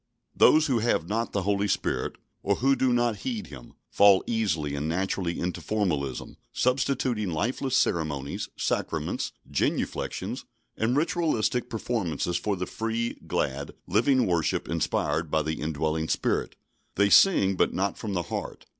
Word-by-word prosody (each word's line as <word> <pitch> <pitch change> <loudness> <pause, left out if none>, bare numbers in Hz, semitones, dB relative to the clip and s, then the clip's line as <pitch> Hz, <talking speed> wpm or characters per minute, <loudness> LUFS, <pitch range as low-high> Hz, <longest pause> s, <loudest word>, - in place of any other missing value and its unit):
Those 155 0 +6
who 130 -6 +1
have 110 -7 +1
not 115 +3 -1
the 100 - -1
Holy 100 +1 +1
Spirit, - - -1 0.3
or 100 - +1
who 135 +5 +3
do 130 0 +2
not 120 -3 +1
heed 110 -2 -4
Him, 65 -5 -12 0.2
fall 100 -2 +6
easily 85 -11 -1
and 70 +2 -2
naturally 90 0 -1
into 90 +1 -3
formalism, 85 -11 -2
substituting 125 -4 0
lifeless 125 - 0
ceremonies, 75 -4 -1
sacraments, - - -2 0.2
genuflections, - - -2 0.3
and 120 +4 +1
ritualistic 150 -7 0
performances 100 - -2
for 105 +3 0
the 90 0 -3
free, 115 +3 -2
glad, 70 +1 -2
living 125 +6 +3
worship 85 -3 0
inspired 80 0 -1
by 80 0 +1
the 80 +1 -3
indwelling 80 +1 -1
Spirit. - - 0 0.4
They 100 +1 +3
sing, 100 - +6
but 95 - +2
not 100 +1 -1
from 105 -3 -5
the 90 -2 0
heart. 75 - -6
100 Hz, 145 wpm, -27 LUFS, 80-120 Hz, 0.4 s, Those